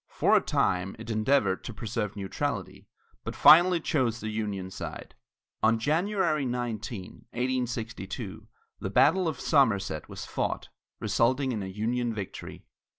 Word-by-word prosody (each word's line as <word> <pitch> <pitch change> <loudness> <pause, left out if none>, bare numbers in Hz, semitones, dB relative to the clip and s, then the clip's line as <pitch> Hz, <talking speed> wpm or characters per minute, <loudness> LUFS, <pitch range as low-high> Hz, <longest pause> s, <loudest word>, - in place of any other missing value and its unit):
For - - +3
a - - +5
time, 90 +1 0
it 115 +1 -6
endeavored 110 -3 +2
to 120 - -7
preserve 110 -2 -3
neutrality, 95 -2 -4 0.4
but - - -5
finally 175 +2 +7
chose 130 -8 0
the 110 -1 -4
Union 100 -4 -3
side. - - -7 0.5
On 115 +1 +4
January 165 - +1
19, 120 -5 -4
1862, 120 -4 -3 0.3
the - - -3
battle 180 +3 +4
of 160 - -3
Somerset 100 - +2
was - - -7
fought, - - -3 0.3
resulting 130 +3 +1
in 110 -4 -2
a 95 - -4
Union 115 +4 -1
victory. 100 -3 -7
115 Hz, 135 wpm, -28 LUFS, 105-135 Hz, 0.5 s, finally